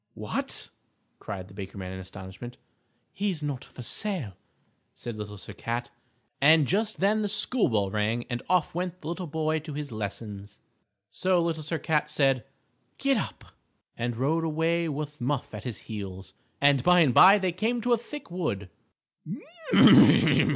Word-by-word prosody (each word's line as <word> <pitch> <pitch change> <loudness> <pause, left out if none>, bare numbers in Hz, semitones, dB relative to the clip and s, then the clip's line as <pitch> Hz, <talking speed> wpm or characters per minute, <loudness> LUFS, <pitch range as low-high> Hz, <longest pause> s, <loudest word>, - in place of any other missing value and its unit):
"What!" - - -4 0.5
cried 95 -2 -7
the 95 - -15
Baker 100 0 -8
Man, 95 -1 -6
in 95 - -7
astonishment. 95 +5 -9 0.6
"He's 190 -6 -2
not 140 -4 -3
for 125 - -11
sale," 175 - 0 0.6
said 120 -2 -6
Little 105 -1 -7
Sir 105 - -10
Cat. 120 +3 -4 0.5
And 155 +1 +6
just 210 - -1
then 210 +3 +3
the 205 - -1
school 215 +4 +3
bell 100 -4 0
rang 110 +3 -1
and 120 -2 -4
off 180 -4 +2
went 180 +1 -3
the 155 - -6
little 175 +1 -4
boy 155 +1 -1
to 155 -1 -8
his 145 -2 -5
lessons. 105 -1 -6 0.5
So 185 - +1
Little 165 -2 -1
Sir 160 +2 -2
Cat 150 0 0
said 135 -5 +1 0.5
"Gid - - +2
ap!" - - -6 0.5
and 120 0 -3
rode 155 +6 +1
away 165 +1 0
with 150 -1 -5
Muff 130 0 -2
at 105 -1 -8
his 120 -5 -4
heels, 95 -3 -7 0.3
and 140 -2 +4
by 180 +5 +5
and 140 -7 +4
by 195 - +8
they 190 -3 0
came 220 +7 -1
to 245 +1 +2
a - - +4
thick 285 -3 -9
wood. 100 - -3
145 Hz, 165 wpm, -27 LUFS, 110-175 Hz, 0.6 s, by